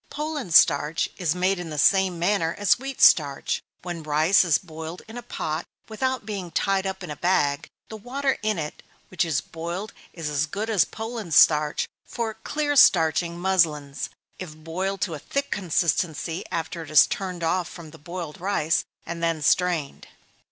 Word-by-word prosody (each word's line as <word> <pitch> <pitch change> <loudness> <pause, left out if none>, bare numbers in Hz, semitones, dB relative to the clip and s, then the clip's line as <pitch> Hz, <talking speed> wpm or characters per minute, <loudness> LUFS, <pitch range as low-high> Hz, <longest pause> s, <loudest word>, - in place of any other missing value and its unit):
Poland 300 - -4
starch 150 +1 +4
is 175 -3 0
made 185 +1 +1
in 175 -2 -6
the 150 - -6
same 190 +3 +3
manner 170 -1 +1
as 205 +2 +3
wheat 270 0 -6
starch. 145 -4 +4 0.2
When 175 -2 -5
rice 155 +6 +3
is 165 -5 +3
boiled 160 +2 -9
in 220 - -11
a 245 - -5
pot 160 -8 -4 0.2
without 260 +2 -2
being 200 -5 -5
tied 195 +3 0
up 190 0 -5
in 170 - -6
a - - -5
bag, 145 -5 +1 0.2
the 220 - -8
water 270 +5 -2
in 215 -1 0 0.5
which 185 - 0
it - - -3
is 155 -5 0
boiled 170 +5 -6 0.2
is 165 -3 -6
as 150 0 0
good 210 +7 -3
as 200 -6 +4
Poland 225 -7 -5
starch 150 -1 +4 0.2
for 230 -2 -3
clear 290 +6 -2
starching 170 - +4
muslins, 160 -6 0 0.3
if 170 -5 -7
boiled 185 +5 -4
to 170 - -1
a 150 - -6
thick 280 - -3
consistency 170 -2 -1
after 165 +1 -3
it 160 - -9
is 155 - +7
turned 180 -3 -4
off 175 +1 0
from 165 -3 -11
the - - -14
boiled 170 0 -7
rice, 175 -4 +1 0.2
and 170 0 -6
then 165 -1 0
strained. 165 -3 +1
175 Hz, 175 wpm, -24 LUFS, 160-200 Hz, 0.5 s, is